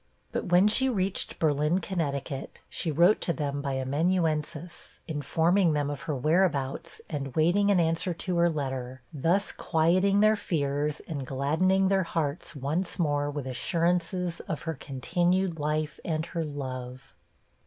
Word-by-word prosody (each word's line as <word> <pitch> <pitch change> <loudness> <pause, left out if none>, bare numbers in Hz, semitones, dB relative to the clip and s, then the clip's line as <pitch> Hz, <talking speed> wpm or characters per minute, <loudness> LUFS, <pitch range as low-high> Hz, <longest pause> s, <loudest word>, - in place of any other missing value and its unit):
But - - -2
when 180 +3 +5
she 265 +5 +3
reached 195 -5 -1
Berlin, 150 +3 +2
Conn., 140 -7 -3 0.3
she 170 - -3
wrote 175 +8 +4
to - - 0
them 145 -1 -2
by 140 -1 -2
amanuensis, 155 +3 -1
informing 165 +4 +2
them 145 -1 0
of 140 -1 -6
her 150 - +1
whereabouts, 155 +1 0
and 140 -4 -5
waiting 175 +6 +3
an 200 -3 +4
answer 165 +2 +1
to 175 +1 -2
her 170 0 +4
letter; 130 -4 -4
thus 170 +8 +1
quieting 185 +5 +2
their 215 0 +5
fears, 150 -5 -1
and 145 -4 -5
gladdening 160 +9 +2
their 195 -1 +3
hearts 160 -2 -3
once 155 +8 -2
more 145 -4 +1
with 145 -2 -4
assurances 170 +5 0
of 160 - -4
her 160 - -2
continued 175 +6 0
life 150 +1 -1
and 160 -1 -1
her 170 -1 -3
love. 130 -4 -6
160 Hz, 145 wpm, -28 LUFS, 145-180 Hz, 0.3 s, when